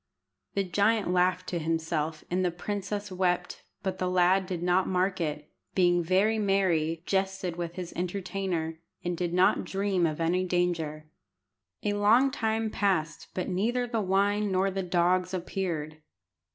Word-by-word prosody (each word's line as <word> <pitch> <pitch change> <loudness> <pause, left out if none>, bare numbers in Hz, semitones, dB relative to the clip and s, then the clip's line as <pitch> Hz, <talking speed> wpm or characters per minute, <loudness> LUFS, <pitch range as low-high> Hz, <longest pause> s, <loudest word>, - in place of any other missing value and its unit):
The 200 - +2
giant 205 +2 +2
laughed 180 0 +2
to 175 - -1
himself, 160 -1 -2
and 185 +1 +1
the 180 - +2
princess 205 +3 -4
wept, 180 -1 -1 0.2
but 190 -1 -2
the 185 - 0
lad 185 +1 +3
did 180 -2 -3
not 180 +1 +2
mark 185 0 0
it, 150 -2 -3 0.2
being 175 -2 +4
very 195 +6 +2
merry, 175 -5 +1
jested 190 -2 -1
with 170 0 -4
his 180 -2 -6
entertainer, 180 -3 -3 0.2
and 175 0 -1
did 175 0 -2
not 180 +1 +3
dream 195 -3 0
of 155 0 -4
any 175 +3 +1
danger. 170 -4 -1 0.8
A 205 - +1
long 225 +7 +4
time 220 -2 -1
passed, 185 -7 0
but 185 - -2
neither 230 +7 0
the 235 -2 -1
wine 200 +2 +1
nor 190 +1 +2
the 195 0 -2
dogs 180 +1 +1
appeared. 165 -4 -3
185 Hz, 150 wpm, -28 LUFS, 175-195 Hz, 0.8 s, being